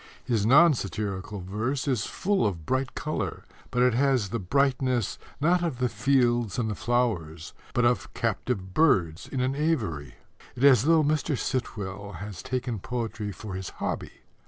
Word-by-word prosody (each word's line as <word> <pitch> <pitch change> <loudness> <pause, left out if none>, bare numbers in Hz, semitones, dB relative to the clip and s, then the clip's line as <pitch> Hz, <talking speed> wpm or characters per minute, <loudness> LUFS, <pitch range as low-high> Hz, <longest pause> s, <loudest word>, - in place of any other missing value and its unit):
His 110 -4 +1
non 150 +6 +7
satirical 100 -2 -4
verse 115 +10 -2
is 125 -6 0
full 200 +1 0
of 85 -6 -4
bright 130 0 -1
colour, 155 - -3 0.2
but 125 - +2
it 125 -1 +4
has 130 -5 +2
the 115 - -2
brightness, 130 +1 +1 0.2
not 170 +5 +3
of 160 -7 -1
the 125 0 +1
fields 120 -2 +2
and 110 -3 0
the - - -1
flowers, 100 -10 -1 0.2
but 120 - +3
of 120 0 +1
captive 105 -4 -2
birds 95 - +2
in 130 - -2
an 130 +1 +1
aviary. 110 - -1 0.4
It 125 - -4
is 135 -4 +8
as - - -1
though 160 0 +5
Mr. 150 -1 0
Sitwell 100 -6 -4
had 100 +5 -7
taken 125 -1 -3
poetry 115 -1 -4
for 100 +2 -8
his 95 0 -4
hobby. - - -4
120 Hz, 165 wpm, -27 LUFS, 100-135 Hz, 0.4 s, is